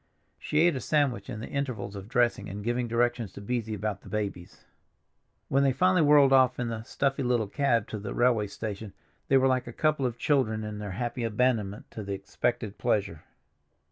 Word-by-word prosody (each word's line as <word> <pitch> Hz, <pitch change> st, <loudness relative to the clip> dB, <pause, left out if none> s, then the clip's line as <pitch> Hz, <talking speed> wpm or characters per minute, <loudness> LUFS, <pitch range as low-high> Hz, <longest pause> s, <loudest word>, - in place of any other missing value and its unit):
She 150 Hz, -, +1 dB
ate 170 Hz, -2 st, +4 dB
a 130 Hz, -, -3 dB
sandwich 135 Hz, -9 st, 0 dB
in 110 Hz, -, -5 dB
the -, -, -6 dB
intervals 125 Hz, -8 st, -3 dB
of 100 Hz, +1 st, -8 dB
dressing 120 Hz, -1 st, +1 dB
and 100 Hz, +1 st, -6 dB
giving 120 Hz, +2 st, -1 dB
directions 120 Hz, -2 st, 0 dB
to -, -, -9 dB
Beesy 110 Hz, 0 st, -2 dB
about 105 Hz, -1 st, -3 dB
the -, -, -13 dB
babies. 100 Hz, -4 st, -5 dB, 0.8 s
When 135 Hz, -, +2 dB
they 135 Hz, -1 st, +3 dB
finally 185 Hz, +4 st, +3 dB
whirled 145 Hz, -2 st, +6 dB
off 130 Hz, -1 st, +4 dB
in 120 Hz, -1 st, -1 dB
the 110 Hz, -1 st, -4 dB
stuffy 135 Hz, +4 st, -1 dB
little 120 Hz, -3 st, +1 dB
cab 115 Hz, -1 st, +1 dB
to 110 Hz, -, -4 dB
the 100 Hz, 0 st, -6 dB
railway 120 Hz, -4 st, +3 dB
station 105 Hz, 0 st, -6 dB, 0.3 s
they 135 Hz, -, +5 dB
were 130 Hz, -, +3 dB
like 130 Hz, -2 st, +1 dB
a -, -, -5 dB
couple 150 Hz, 0 st, +1 dB
of 120 Hz, -1 st, -5 dB
children 115 Hz, -6 st, +1 dB
in 105 Hz, -1 st, -5 dB
their 100 Hz, -3 st, -5 dB
happy 120 Hz, 0 st, -3 dB
abandonment 110 Hz, -3 st, 0 dB
to 110 Hz, -, -6 dB
the 100 Hz, 0 st, -4 dB
expected 105 Hz, +2 st, -3 dB
pleasure. 95 Hz, -7 st, 0 dB
120 Hz, 200 wpm, -28 LUFS, 105-130 Hz, 0.8 s, whirled